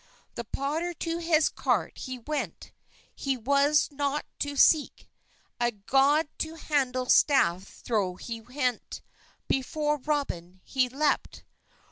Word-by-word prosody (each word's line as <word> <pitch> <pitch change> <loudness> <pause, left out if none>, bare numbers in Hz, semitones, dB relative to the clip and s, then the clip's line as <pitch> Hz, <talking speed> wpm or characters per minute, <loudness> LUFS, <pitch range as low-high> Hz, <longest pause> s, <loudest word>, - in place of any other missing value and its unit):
The 235 - -5
potter 315 +9 -2
to 330 +1 -3
hes 325 -2 +3
cart - - -1
he 255 0 -5
went, 295 +5 -5 0.4
He 270 -2 -2
was 280 +5 +3
not 285 +1 -1
to 285 0 -2
seke; 300 +1 +4 0.5
A 240 0 +2
god 275 +9 +3
to 320 +1 -3
hande 265 -5 -1
staffe 190 - +3
therowt 195 -6 -1
he 230 -1 -6
hent, 255 -4 -2 0.4
Befor 295 +3 0
Roben 220 - -3
he 255 -2 0
lepe. 290 +4 -1
280 Hz, 120 wpm, -28 LUFS, 245-300 Hz, 0.5 s, seke